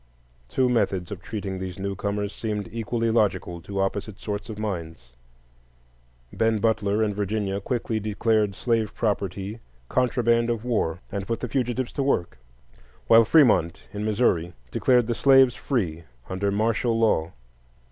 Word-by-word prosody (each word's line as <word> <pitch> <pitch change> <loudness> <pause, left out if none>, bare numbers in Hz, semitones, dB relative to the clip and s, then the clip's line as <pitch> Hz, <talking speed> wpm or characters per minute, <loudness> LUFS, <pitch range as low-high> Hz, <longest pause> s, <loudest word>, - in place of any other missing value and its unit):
Two 130 - +2
methods 100 -7 0
of 100 -2 -6
treating 100 -3 -5
these 95 -1 -5
newcomers 100 +1 -3
seemed 105 -2 -3
equally 115 0 -1
logical 95 -6 0
to 100 +4 -5
opposite 100 +1 -2
sorts 105 0 -5
of 110 - -6
minds. 80 - -5 1.2
Ben 110 -1 +2
Butler, 105 -1 +1
in 105 -1 0
Virginia, 100 -1 -2
quickly 115 0 -2
declared 105 -1 +1
slave 115 -2 0
property 100 0 -2 0.3
contraband 120 -2 +2
of 115 -1 -2
war, 90 -9 0
and 100 -1 -4
put 115 - -1
the 125 - -3
fugitives 125 0 -1
to 140 - -2
work; 85 - 0 0.7
while 115 0 +7
Fremont, 110 - +4
in 105 0 -4
Missouri, 100 -6 +1 0.2
declared 125 - +3
the 120 - -1
slaves 135 0 +5
free 100 - -2 0.2
under 95 +2 -1
martial 115 +3 +1
law. 105 -8 +2
105 Hz, 140 wpm, -25 LUFS, 95-115 Hz, 1.2 s, while